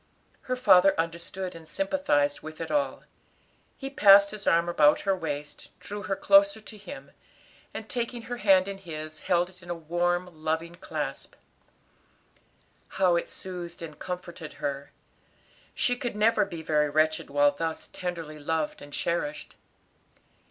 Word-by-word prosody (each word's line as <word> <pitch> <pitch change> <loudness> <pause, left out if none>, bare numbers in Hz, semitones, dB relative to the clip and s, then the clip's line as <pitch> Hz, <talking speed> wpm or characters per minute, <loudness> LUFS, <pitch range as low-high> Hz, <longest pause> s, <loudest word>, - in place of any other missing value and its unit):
Her 255 - +2
father 195 -7 +5
understood 170 +3 -3
and 165 -1 -12
sympathized 215 - +1
with 155 0 -9
it 165 - -4
all. 290 -1 0 0.7
He 270 -1 -6
passed 200 -5 +7
his 215 -1 -7
arm 170 +1 +4
about 150 -3 +4
her 195 -1 +1
waist, 150 -4 -5
drew 205 0 -6
her 195 0 -2
closer 295 -1 +5
to 215 0 -12
him, 175 -9 -10 0.6
and - - -7
taking 240 -2 -3
her 245 +1 -5
hand 195 -4 +4
in 195 -1 -5
his, 155 -3 -7
held 175 -1 +1
it 185 0 -18
in 175 - -14
a 175 - -2
warm, 175 +2 0 0.2
loving 160 +2 -1
clasp. 175 - -5 1.6
How 185 -2 +4
it 170 - -1
soothed 175 -2 -7
and 155 -2 -9
comforted 180 -3 -6
her. 140 0 -4 0.8
She 245 - +1
could 245 -3 -4
never 215 0 +3
be 170 -5 -7
very 150 -1 +2
wretched 155 +1 +1
while 145 0 +4
thus 160 +2 -4
tenderly 165 -4 -5
loved, 155 +1 -2
and 145 - -11
cherished. 175 - -2
175 Hz, 150 wpm, -27 LUFS, 155-200 Hz, 1.6 s, passed